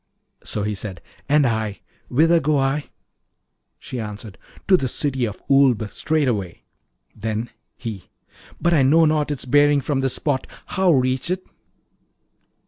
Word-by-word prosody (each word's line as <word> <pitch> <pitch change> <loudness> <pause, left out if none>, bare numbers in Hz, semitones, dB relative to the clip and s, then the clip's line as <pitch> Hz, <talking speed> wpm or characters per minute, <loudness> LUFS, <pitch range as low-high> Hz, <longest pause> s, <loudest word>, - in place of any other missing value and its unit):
So 105 - -2
he 105 0 -1
said, 95 -3 -5 0.3
'And 145 0 +4
I 110 -3 -1 0.3
whither 165 +6 +4
go 155 -2 +1
I?' 135 +2 0 0.9
She 125 - -7
answered, 105 -2 -7 0.3
'To 190 - +6
the 135 - -1
City 130 0 -1
of 105 -2 -7
Oolb 135 -6 +4
straightway.' 125 - -1 0.5
Then 110 +1 -3 0.3
he, 105 -6 -7 0.5
'But 170 - +2
I 150 - +4
know 155 +5 +5
not 155 -1 +1
its 145 -4 -2
bearing 145 +2 +4
from 140 0 -1
this 135 -1 0
spot: 140 -3 -1 0.2
how 190 -1 +2
reach 130 +1 +1
it?' 185 +1 -2
135 Hz, 140 wpm, -22 LUFS, 110-150 Hz, 0.9 s, To